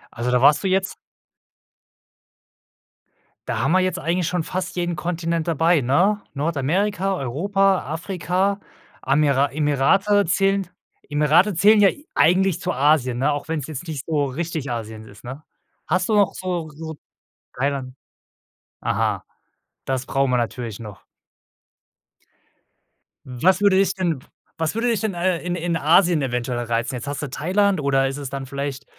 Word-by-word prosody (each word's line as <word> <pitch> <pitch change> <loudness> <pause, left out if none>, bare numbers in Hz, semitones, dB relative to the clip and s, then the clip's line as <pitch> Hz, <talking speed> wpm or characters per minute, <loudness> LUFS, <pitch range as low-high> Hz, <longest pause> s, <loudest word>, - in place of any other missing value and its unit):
Also 120 +1 -2
da 125 0 +2
warst 145 +5 +5
du 195 - +1
jetzt 190 0 0 2.5
Da - - -2
haben 135 +6 +1
wir 185 - +5
jetzt 185 -2 -1
eigentlich 170 +1 -1
schon 175 -2 -1
fast 185 +1 -4
jeden 175 -1 -1
Kontinent 170 0 -2
dabei, 165 0 +3
ne? 185 +12 +2
Nordamerika, 175 +7 0
Europa, 195 +9 +1
Afrika, 185 +3 -1 0.4
Amira 140 0 +2
Emirate 155 +8 +2
zählen 195 +2 +1 0.4
Emirate 150 +7 +3
zählen 205 +5 +5
ja 195 - +7 0.3
eigentlich 185 +1 +3
zu - - -1
Asien, 135 -3 +2
ne? 145 +3 +1
Auch 145 +2 -5
wenn's 155 -4 -2
jetzt 155 +2 -6
nicht 150 -5 -5
so 150 -3 0
richtig 150 0 -4
Asien 110 -2 -6
ist, 105 0 -15
ne? 135 +5 -8 0.4
Hast 185 0 +1
du 220 - +1
noch 205 -2 +3
so 175 -4 -4
so 160 +1 -8 0.6
Thailand 135 -1 -2 0.9
Aha, - - -1 0.6
das 130 -1 -2
brauchen 135 -1 0
wir 125 - +2
natürlich 115 -2 -3
noch. 105 -3 -10 2.2
Was 175 +11 +1
würde 200 -2 +4
dich 195 0 +3
denn 170 -7 -1 0.4
was 160 +3 -1
würde 230 +2 0
dich 230 -4 +1
denn, 220 -3 -1
äh, 175 0 0
in 180 +1 -3
in 170 -1 -1
Asien 170 +1 +4
eventuell 125 -1 -2
reizen? 120 +2 -2
Jetzt 120 +2 -6
hast 145 0 -4
du 140 - -4
Thailand, 190 +4 +1
oder 135 -1 +2
ist 135 +1 -4
es 140 -3 -6
dann 135 -1 -5
vielleicht 140 0 -5
160 Hz, 150 wpm, -22 LUFS, 135-185 Hz, 2.5 s, ja